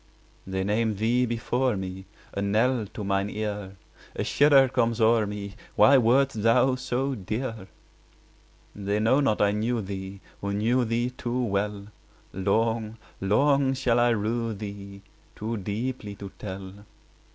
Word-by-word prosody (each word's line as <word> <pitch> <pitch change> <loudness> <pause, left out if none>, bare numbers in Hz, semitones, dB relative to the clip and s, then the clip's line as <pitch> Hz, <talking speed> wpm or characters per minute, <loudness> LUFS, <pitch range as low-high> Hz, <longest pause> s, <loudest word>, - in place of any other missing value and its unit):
They 95 0 -2
name 110 +2 0
thee 120 +4 +1
before 120 +1 0
me, 95 0 -6 0.3
A 100 - -2
knell 110 +3 +1
to 105 - -6
mine 100 0 0
ear; 105 -2 -4 0.4
A - - -1
shudder 140 -2 +5
comes 115 -2 0
o'er 110 -1 +4
me— 100 -1 -6 0.2
Why 140 -1 +7
wert 130 +4 +4
thou 120 +2 +3
so 130 +2 -1
dear? 110 -1 -4 1.1
20 100 - -9
They 100 +1 +1
know 115 +6 +3
not 140 -7 +1
I 100 - +3
knew 115 +3 0
thee, 95 -1 -6 0.2
Who 100 0 -2
knew 120 +4 +2
thee 120 +2 -1
too 125 0 -2
well: 100 -1 -2 0.5
Long, 110 +3 0 0.2
long 135 +7 +2
shall 125 -2 +2
I 120 0 +4
rue 115 +1 -1
thee, 100 -1 -8 0.3
Too 110 +2 -3
deeply 105 +1 -4
to 100 -1 -9
tell. 95 -1 -7
110 Hz, 145 wpm, -26 LUFS, 100-120 Hz, 1.1 s, Why